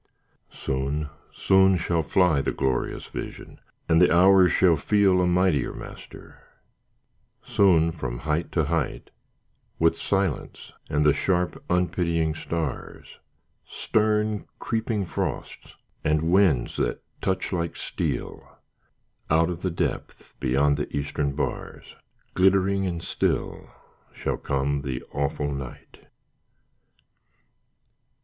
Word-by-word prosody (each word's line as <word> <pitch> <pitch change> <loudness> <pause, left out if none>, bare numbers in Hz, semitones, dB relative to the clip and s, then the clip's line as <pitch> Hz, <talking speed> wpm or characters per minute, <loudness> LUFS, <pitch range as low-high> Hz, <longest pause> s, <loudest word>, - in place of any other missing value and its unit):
Soon, 70 +3 -3 0.2
soon 95 -1 +4
shall 85 -1 0
fly 80 -1 +2
The - - -1
glorious 65 -2 -2
vision, - - -8 0.3
and 80 +1 +4
the 90 - +5
hours 95 +1 +6
shall 90 -3 +4
feel 95 +3 +3
A 90 - +2
mightier 90 -6 +2
master; - - -11 1.0
soon 85 -5 +3
from 65 -7 -5
height 80 +2 -1
to 80 - +2
height, 80 0 -2 0.7
With 80 0 +3
silence 95 +2 -2 0.2
and 75 +1 +1
the 75 - +6
sharp 90 -2 -1
unpitying 85 -2 +1
stars, 80 -3 -5 0.4
Stern 105 -1 0
creeping 110 -3 -2
frosts, - - -5 0.3
and 75 0 +1
winds 90 -10 +3
that - - -1 0.2
touch 95 +1 -1
like 85 -2 -2
steel, - - -4 0.7
Out 80 +2 +3
of 85 0 -6
the 95 - -1
depth 85 - -4
beyond 70 +2 +2
the 75 - -3
eastern 70 0 -2
bars, 70 - -5 0.4
Glittering 95 +1 +3
and 85 -2 -4
still - - -2 0.5
shall - - -2
come 70 +1 -1
the 65 -2 -4
awful 70 +1 -1
night. 70 -3 -9
85 Hz, 110 wpm, -25 LUFS, 75-95 Hz, 1.0 s, hours